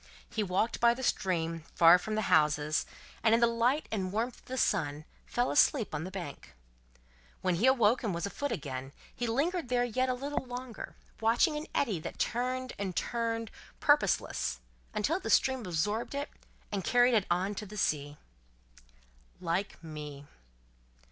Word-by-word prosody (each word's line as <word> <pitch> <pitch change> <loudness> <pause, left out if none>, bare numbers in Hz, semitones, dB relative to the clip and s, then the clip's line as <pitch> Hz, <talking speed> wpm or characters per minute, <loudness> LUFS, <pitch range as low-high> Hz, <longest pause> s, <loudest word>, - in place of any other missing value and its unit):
He 220 - -2
walked 200 +4 0
by 235 0 +5
the 260 - -6
stream, 165 -7 0 0.2
far 170 +1 +8
from 215 +4 -3
the 215 - 0
houses, 150 0 +3 0.3
and 225 0 +5
in - - +2
the 235 - +6
light 235 +6 +1
and 190 -4 -2
warmth 230 +4 -2
of - - -26
the 260 - -5
sun 150 - 0 0.2
fell 245 +1 0
asleep 275 - +3
on 155 +2 -2
the - - -5
bank. 180 -7 -8 0.9
When 185 - +1
he 200 +9 +2
awoke 245 -3 +4
and 215 - -1
was 170 +1 -2
afoot 285 +8 -3
again, 135 -1 -5 0.2
he 245 - -2
lingered 305 +6 0
there 245 -1 +2
yet 255 +2 0
a 255 - +1
little 280 +3 -3
longer, 250 -2 -7 0.2
watching 235 +8 +3
an 300 +1 -4
eddy 215 - +1
that - - -7
turned 255 +2 -1
and 190 -3 -3
turned 230 -2 -2 0.3
purposeless, - - +2 0.3
until 295 - 0
the - - -5
stream 265 0 +3
absorbed 205 - -1
it, 285 +1 -3 0.4
and 200 -2 -2
carried 245 +5 +4
it 210 -4 +2
on 185 +4 +1
to 210 +1 -6
the 210 +2 -9
sea. 145 -5 -1 1.2
"Like 175 +1 -2
me." 150 -3 -8
220 Hz, 170 wpm, -31 LUFS, 170-245 Hz, 1.2 s, far